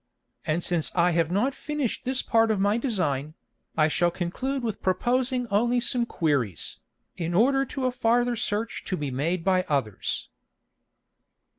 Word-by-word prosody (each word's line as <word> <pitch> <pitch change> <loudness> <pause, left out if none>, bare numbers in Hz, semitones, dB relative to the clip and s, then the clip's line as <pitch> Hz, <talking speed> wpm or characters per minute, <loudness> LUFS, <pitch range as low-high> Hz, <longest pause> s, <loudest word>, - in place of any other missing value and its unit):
And 165 +3 0
since 170 -3 0
I 175 0 +4
have 165 -1 +1
not 210 +10 +1
finish'd 295 -4 -3
this 260 +1 0
part 225 0 +3
of 215 -3 +1
my 205 +3 +2
Design, 155 - -1 0.4
I 155 -1 +5
shall 175 +3 +2
conclude 250 +11 -3
with 225 -3 -3
proposing 250 +6 +1
only 240 +4 +3
some 240 0 +1
Queries, 135 - -1 0.4
in 170 -1 -2
order 270 +6 +4
to 265 0 -4
a 255 - +2
farther 240 0 +2
search 220 0 -2
to 185 - -2
be 145 -2 -3
made 165 +7 -1
by 185 0 +3
others. 130 -9 -1
200 Hz, 155 wpm, -26 LUFS, 165-245 Hz, 0.4 s, I